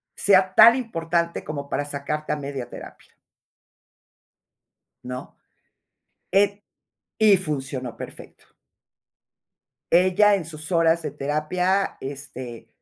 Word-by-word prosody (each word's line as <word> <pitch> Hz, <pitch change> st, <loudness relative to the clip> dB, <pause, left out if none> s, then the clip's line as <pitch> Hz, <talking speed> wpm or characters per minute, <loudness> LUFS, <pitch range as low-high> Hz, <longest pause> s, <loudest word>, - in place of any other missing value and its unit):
sea 190 Hz, -2 st, +3 dB
tan 230 Hz, +4 st, +8 dB
importante, 170 Hz, -8 st, -2 dB
como 145 Hz, -2 st, -6 dB
para 145 Hz, -, -2 dB
sacarte 145 Hz, +2 st, -4 dB
a -, -, +1 dB
media 140 Hz, -3 st, -6 dB
terapia", -, -, -12 dB, 1.9 s
"¿no? 125 Hz, 0 st, -7 dB, 1.0 s
Eh, 200 Hz, +1 st, +2 dB, 0.5 s
y 215 Hz, -2 st, +6 dB
funcionó 135 Hz, -, -4 dB
perfecto. -, -, -11 dB, 1.5 s
Ella, 185 Hz, +4 st, +5 dB
en 180 Hz, -5 st, -4 dB
sus 160 Hz, +1 st, -8 dB
horas 165 Hz, 0 st, +3 dB
de 145 Hz, -, -4 dB
terapia, 155 Hz, +7 st, -1 dB
este, 130 Hz, -3 st, -8 dB
160 Hz, 100 wpm, -23 LUFS, 140-190 Hz, 1.9 s, tan